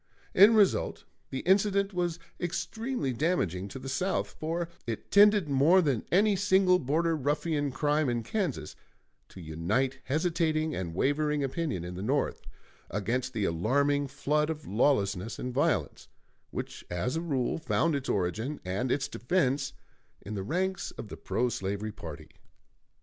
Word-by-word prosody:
In 205 Hz, +4 st, +8 dB
result 205 Hz, -3 st, +2 dB, 0.3 s
the 135 Hz, -, -3 dB
incident 200 Hz, +1 st, +2 dB
was 175 Hz, -2 st, -1 dB, 0.2 s
extremely 205 Hz, -, -2 dB
damaging 100 Hz, -, 0 dB
to 100 Hz, -, -8 dB
the 130 Hz, 0 st, -8 dB
South, 180 Hz, +9 st, -1 dB
for 165 Hz, +2 st, -2 dB, 0.2 s
it 115 Hz, -2 st, -5 dB
tended 205 Hz, -3 st, +6 dB
more 145 Hz, +7 st, +5 dB
than 140 Hz, -10 st, +1 dB
any 205 Hz, +3 st, +4 dB
single 190 Hz, -2 st, +4 dB
Border 165 Hz, +4 st, +1 dB
Ruffian 150 Hz, 0 st, 0 dB
crime 150 Hz, +2 st, +1 dB
in 120 Hz, -1 st, -1 dB
Kansas 185 Hz, -, -3 dB, 0.5 s
to -, -, -12 dB
unite 95 Hz, +12 st, -1 dB
hesitating 160 Hz, +1 st, 0 dB
and 85 Hz, -6 st, -4 dB
wavering 150 Hz, +5 st, +1 dB
opinion 135 Hz, -, -2 dB
in 90 Hz, +1 st, -6 dB
the 90 Hz, -, -6 dB
North 135 Hz, +8 st, 0 dB, 0.5 s
against 120 Hz, +6 st, -2 dB
the 110 Hz, -4 st, 0 dB
alarming 140 Hz, -, +1 dB
flood 150 Hz, +3 st, 0 dB
of 155 Hz, -1 st, -4 dB
lawlessness 105 Hz, -3 st, +1 dB
and 125 Hz, 0 st, -4 dB
violence, 135 Hz, -, 0 dB, 0.4 s
which -, -, -6 dB
as 90 Hz, -, -2 dB
a 165 Hz, -, -1 dB
rule 140 Hz, -4 st, -1 dB
found 165 Hz, 0 st, +1 dB
its 140 Hz, -2 st, -2 dB
origin 105 Hz, -, -1 dB
and 100 Hz, +8 st, -1 dB
its 135 Hz, -, 0 dB
defense 140 Hz, 0 st, 0 dB, 0.5 s
in 105 Hz, -, -7 dB
the 100 Hz, -, -3 dB
ranks 185 Hz, -, -1 dB
of 105 Hz, -, -9 dB
the -, -, -6 dB
pro 125 Hz, -, 0 dB
slavery 100 Hz, -1 st, -3 dB
party. 80 Hz, -8 st, -9 dB
145 Hz, 150 wpm, -29 LUFS, 115-170 Hz, 0.5 s, In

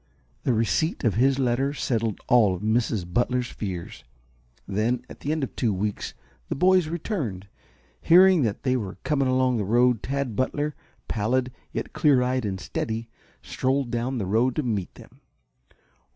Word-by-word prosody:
The 130 Hz, -, +3 dB
receipt 115 Hz, +9 st, 0 dB
of 115 Hz, -5 st, +2 dB
his 130 Hz, +4 st, +3 dB
letter 135 Hz, +2 st, 0 dB
settled 115 Hz, -6 st, -1 dB
all 110 Hz, -6 st, +4 dB
of 90 Hz, -, -8 dB
Mrs. 110 Hz, -3 st, +1 dB
Butler's 125 Hz, +1 st, 0 dB
fears. 90 Hz, -5 st, -6 dB, 0.6 s
Then, 115 Hz, +5 st, 0 dB
at -, -, -12 dB
the 145 Hz, -, -3 dB
end 155 Hz, -2 st, -1 dB
of 135 Hz, -, -5 dB
two 115 Hz, -, +1 dB
weeks, 105 Hz, +2 st, -3 dB, 0.3 s
the -, -, -1 dB
boys 180 Hz, +2 st, +4 dB
returned. 150 Hz, -, -4 dB, 0.5 s
Hearing 185 Hz, -, +6 dB
that 110 Hz, -5 st, -1 dB
they 130 Hz, -1 st, +2 dB
were 100 Hz, -6 st, -4 dB
coming 140 Hz, -3 st, +1 dB
along 130 Hz, -1 st, +2 dB
the 105 Hz, -, 0 dB
road 120 Hz, +3 st, +3 dB
Tad 135 Hz, -4 st, -2 dB
Butler, 145 Hz, +4 st, -1 dB, 0.3 s
pallid 125 Hz, +4 st, 0 dB, 0.2 s
yet -, -, -5 dB
clear 140 Hz, -6 st, +4 dB
eyed 125 Hz, -1 st, 0 dB
and 95 Hz, -2 st, -3 dB
steady, 115 Hz, +4 st, -4 dB, 0.3 s
strolled 130 Hz, -1 st, -1 dB
down 120 Hz, +2 st, -1 dB
the 105 Hz, -, -2 dB
road 115 Hz, +6 st, +1 dB
to 155 Hz, -, 0 dB
meet 105 Hz, -7 st, -2 dB
them. -, -, -16 dB
125 Hz, 165 wpm, -25 LUFS, 110-135 Hz, 0.6 s, Hearing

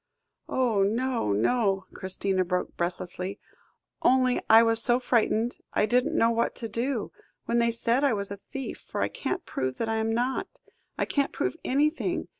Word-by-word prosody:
"Oh! 240 Hz, -6 st, +1 dB
no, 230 Hz, -, 0 dB
no," 195 Hz, -, +1 dB
Christina 190 Hz, 0 st, -1 dB
spoke 180 Hz, 0 st, -2 dB
breathlessly; 180 Hz, +2 st, -3 dB, 0.6 s
"only 255 Hz, -1 st, +3 dB
I 225 Hz, +1 st, +9 dB
was 225 Hz, 0 st, +2 dB
so 240 Hz, +1 st, +3 dB
frightened, 235 Hz, -1 st, +1 dB
I -, -, +3 dB
didn't 245 Hz, +3 st, +1 dB
know 230 Hz, -, +4 dB
what 230 Hz, 0 st, 0 dB
to 230 Hz, -, -4 dB
do, 235 Hz, +2 st, -2 dB, 0.3 s
when 235 Hz, 0 st, +1 dB
they 235 Hz, 0 st, +3 dB
said 235 Hz, +3 st, +1 dB
I 280 Hz, -4 st, +4 dB
was 200 Hz, -1 st, -3 dB
a 200 Hz, -, -5 dB
thief, 270 Hz, +6 st, -7 dB
for -, -, -3 dB
I -, -, 0 dB
can't 375 Hz, -2 st, -3 dB
prove 130 Hz, -1 st, -3 dB
that 225 Hz, -, -2 dB
I 225 Hz, -, 0 dB
am 220 Hz, 0 st, 0 dB
not. 245 Hz, +3 st, 0 dB, 0.5 s
I -, -, +1 dB
can't 280 Hz, -1 st, 0 dB
prove -, -, -2 dB
anything. 300 Hz, +4 st, 0 dB
230 Hz, 175 wpm, -27 LUFS, 200-250 Hz, 0.6 s, I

